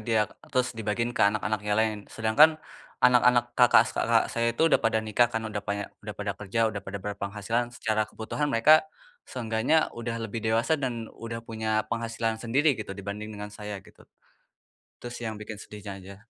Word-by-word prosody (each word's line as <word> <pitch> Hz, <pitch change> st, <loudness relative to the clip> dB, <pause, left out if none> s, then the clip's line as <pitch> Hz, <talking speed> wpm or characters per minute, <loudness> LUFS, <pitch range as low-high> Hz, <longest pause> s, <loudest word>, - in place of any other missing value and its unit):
dia, 110 Hz, -2 st, +2 dB, 0.2 s
terus, 125 Hz, -1 st, 0 dB
dibagiin 110 Hz, +2 st, -1 dB
ke -, -, +3 dB
anak-anak 110 Hz, 0 st, -2 dB
yang 105 Hz, 0 st, 0 dB
lain, 110 Hz, -1 st, +1 dB
sedangkan 115 Hz, +8 st, +5 dB, 0.5 s
anak-anak 125 Hz, -1 st, +5 dB
kakak 125 Hz, -1 st, +7 dB, 0.5 s
saya 115 Hz, 0 st, 0 dB
itu -, -, +2 dB
udah -, -, +5 dB
pada 115 Hz, -1 st, +2 dB
nikah 120 Hz, +3 st, +3 dB
kan, 115 Hz, -, -1 dB
udah 105 Hz, -2 st, -3 dB
paya 100 Hz, 0 st, -2 dB, 0.2 s
udah 105 Hz, 0 st, -7 dB
pada 105 Hz, -1 st, -2 dB
kerja, 105 Hz, +2 st, -5 dB
udah 100 Hz, -, -5 dB
pada 100 Hz, +1 st, -6 dB
berpenghasilan, 105 Hz, +4 st, -2 dB
secara 110 Hz, -3 st, 0 dB
kebutuhan 145 Hz, +7 st, -3 dB
mereka, 155 Hz, +9 st, +5 dB, 0.4 s
seenggaknya 115 Hz, +4 st, 0 dB, 0.2 s
udah 115 Hz, 0 st, -4 dB
lebih 110 Hz, +1 st, -4 dB
dewasa, 115 Hz, +6 st, +2 dB
dan 120 Hz, -4 st, -3 dB
udah 115 Hz, 0 st, -6 dB
punya 110 Hz, -1 st, -1 dB
penghasilan 115 Hz, -1 st, -2 dB
sendiri, 140 Hz, +6 st, +3 dB
gitu, 110 Hz, -, -7 dB
dibanding 100 Hz, +2 st, -6 dB
dengan 105 Hz, 0 st, -7 dB
saya, 105 Hz, -1 st, -6 dB
gitu. -, -, -18 dB, 1.0 s
Itu 120 Hz, -, -6 dB
sih, 120 Hz, -, -6 dB
yang 110 Hz, -, -4 dB
bikin 105 Hz, 0 st, -7 dB
sedihnya 105 Hz, -1 st, -8 dB
aja. 95 Hz, +1 st, -11 dB
110 Hz, 175 wpm, -27 LUFS, 105-120 Hz, 1.0 s, kakak